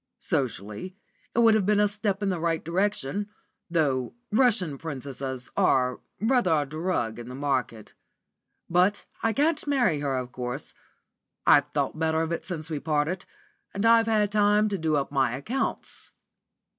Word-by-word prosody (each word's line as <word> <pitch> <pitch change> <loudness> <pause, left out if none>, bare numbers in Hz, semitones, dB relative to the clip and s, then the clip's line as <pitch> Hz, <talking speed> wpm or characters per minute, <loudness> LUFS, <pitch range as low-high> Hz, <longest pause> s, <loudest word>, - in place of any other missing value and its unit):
Socially 130 - -3 0.4
it - - -5
would 225 -1 +6
have 210 -3 +2
been 210 -1 +4
a 210 - +5
step 205 -1 -2
in 200 - +1
the 180 -3 -1
right 165 -1 -1
direction, 200 +1 -1 0.4
though 140 - 0 0.2
Russian 210 - +2
Princesses 135 -4 -5
are 125 -1 +2 0.2
rather 235 -4 +2
a - - -2
drug 145 -7 -2
in 120 - -8
the 125 - -7
market. 130 -6 -2 0.7
But 180 +4 +2 0.2
I 225 - +2
can't 300 +5 +1
marry 245 - +2
her, 140 -2 -1
of 125 -1 -4
course. 125 +3 -5 0.7
I've - - +6
thought - - -1
better 160 0 +1
of 165 - -3
it 170 - -2
since 165 -4 -5
we 155 -3 -3
parted, 155 +4 -1 0.5
and 200 +3 0
I've 230 0 +6
had 210 -2 +2
time 210 0 +3
to 200 - -1
do 160 -1 +1
up 140 -1 -1
my 135 -4 +1
accounts." 235 - -3
165 Hz, 160 wpm, -27 LUFS, 135-210 Hz, 0.7 s, would